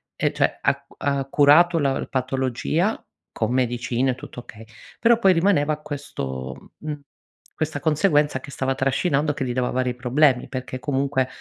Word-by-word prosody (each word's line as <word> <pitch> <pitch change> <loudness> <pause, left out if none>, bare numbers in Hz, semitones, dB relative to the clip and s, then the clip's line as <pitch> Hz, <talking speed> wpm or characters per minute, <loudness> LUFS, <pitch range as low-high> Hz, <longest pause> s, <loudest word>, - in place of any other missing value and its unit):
e - - 0
cioè - - 0
ha - - 0 0.2
ha 140 -1 0
curato 150 +5 +5
la 135 -2 0
patologia 130 - -1 0.3
con 110 +1 -1
medicine 125 0 0
tutto 125 - -10
okay, 110 -1 -13 0.4
però 235 0 +5
poi 190 -4 +5
rimaneva 165 -4 +2
questo, 70 - -6
mhmm, 150 -1 -5 0.6
questa 155 -2 -2
conseguenza 150 -3 +2
che 140 +1 -11
stava 135 0 -1
trascinando, 140 +2 +1
che 135 - -3
gli 125 - -2
dava 125 -1 0
vari 125 -1 0
problemi 125 +1 +2
perché 130 -1 -5
comunque, 135 -1 0
135 Hz, 145 wpm, -23 LUFS, 125-150 Hz, 0.6 s, curato